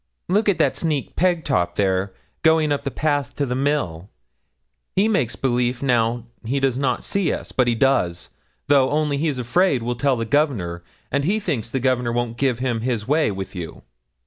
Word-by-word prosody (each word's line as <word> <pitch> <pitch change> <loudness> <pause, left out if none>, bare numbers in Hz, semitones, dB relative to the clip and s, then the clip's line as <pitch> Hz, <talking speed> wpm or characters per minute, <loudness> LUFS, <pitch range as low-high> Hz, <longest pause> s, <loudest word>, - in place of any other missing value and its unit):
'Look 205 +4 +2
at 195 - +2
that - - +2
sneak, 155 -5 -2
Pegtop, 150 - +1
there, 95 -1 +1 0.3
going 160 -2 +3
up 145 -1 0
the - - 0
path 145 -2 -1
to 145 - 0
the 125 - -2
mill. 125 - -1 0.9
He 195 +3 +3
makes 145 - +1
belief 125 0 0
now 120 -2 +1 0.2
he 130 +5 -1
does 135 -2 +1
not 130 -2 -1
see 195 -5 0
us; - - -5
but 125 -2 +2
he 120 - +2
does, 90 -10 +1 0.3
though, 135 -2 +4
only 150 -1 0
he's 150 -3 0
afraid 130 +2 +1
we'll 120 +1 -1
tell 135 +2 +1
the 115 -1 -2
Governor, 110 - 0 0.3
and 140 - +1
he 200 +8 +1
thinks 120 - -2
Governor 125 -1 0
won't 120 -1 -2
give 130 -4 +1
him 120 -3 -1
his 115 -3 -2
way 150 0 +2
with 95 -2 -5
you. 90 -4 -7
130 Hz, 185 wpm, -22 LUFS, 115-145 Hz, 0.9 s, though